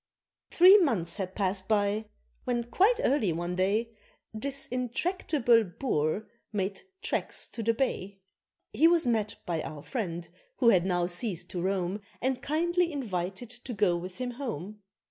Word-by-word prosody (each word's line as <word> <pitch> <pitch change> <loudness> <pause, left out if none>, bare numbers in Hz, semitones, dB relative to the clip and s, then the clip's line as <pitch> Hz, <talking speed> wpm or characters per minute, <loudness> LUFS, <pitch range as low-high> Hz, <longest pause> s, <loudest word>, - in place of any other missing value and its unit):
Three 375 +4 +8
months 200 - 0
had 190 -2 -4
passed 190 -1 -1
by 210 0 +1 0.4
when 240 -1 0
quite 390 - +3
early 255 - +2
one 175 +2 -2
day 205 +5 +1 0.4
This 275 +5 -2
intractable 250 -1 +1
Boer 180 - -1 0.2
made 195 -2 -2 0.2
tracks - - -2
to 230 - -5
the 230 +1 +1
Bay. 200 -6 -2 0.6
He 325 - +5
was 335 -1 +4
met 220 -3 0
by 165 -3 -1
our 150 -2 -7
friend, 175 -9 -3 0.3
who 240 - +4
had 185 -4 +4
now 175 -2 +1
ceased 175 -1 -3
to 175 - -3
roam, 190 +1 -1 0.2
And 260 0 -1
kindly 345 +3 +1
invited 205 - -3
to 245 0 -7
go 195 -4 +3
with 180 +1 -6
him 250 -1 -3
home. 215 - -6
215 Hz, 150 wpm, -29 LUFS, 185-255 Hz, 0.6 s, Three